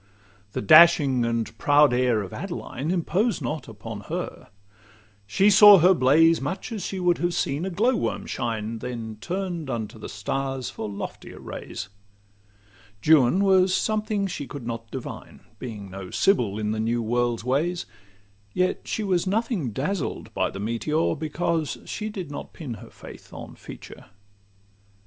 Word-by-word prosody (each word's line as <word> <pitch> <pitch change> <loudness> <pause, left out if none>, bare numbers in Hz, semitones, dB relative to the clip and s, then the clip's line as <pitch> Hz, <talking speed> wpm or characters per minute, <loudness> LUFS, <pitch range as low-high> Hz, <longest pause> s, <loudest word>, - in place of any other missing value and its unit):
The - - -3
dashing 135 -1 +6
and 115 -1 -2
proud 145 -2 +5
air 125 -4 +2
of 95 - -9
Adeline 165 -6 -5
Imposed 185 +6 0
not 150 -2 -4
upon 110 -1 -8
her: - - -5 0.8
she 195 - +4
saw 205 0 +10
her 180 +2 +6
blaze 165 +3 +4
Much 145 - -4
as 215 -4 -4
she 190 - -4
would 180 -1 +2
have 175 0 0
seen 145 +6 -1
a - - -2
glow 225 +8 +2
worm - - -2
shine, 115 -2 -3
Then 115 -3 -6
turn'd 175 -5 -3
unto 110 -2 -4
the 105 - -7
stars 135 +4 -3
for 110 - -5
loftier 100 - -7
rays. 105 - -7 1.2
Juan 155 +4 +5
was 190 -1 +4
something 215 -2 0
she 155 -7 -5
could 135 -2 -8
not 115 -1 -5
divine, - - -8 0.2
Being 105 -6 -7
no 95 -1 -7
sibyl 120 - +2
in 105 -1 -1
the 110 - -2
new 115 +1 0
world's 120 0 0
ways; 155 +8 0 0.7
Yet 185 0 0
she 220 - -2
was 185 -2 0
nothing 210 - 0
dazzled 145 - -3
by - - 0
the 100 - -8
meteor, 115 +10 0
Because 160 0 -2
she 215 0 -4
did 185 -8 -6
not 145 - -7
pin 140 -8 -6
her - - -12
faith - - -13
on - - -9
feature. - - -11
145 Hz, 155 wpm, -25 LUFS, 115-185 Hz, 1.2 s, saw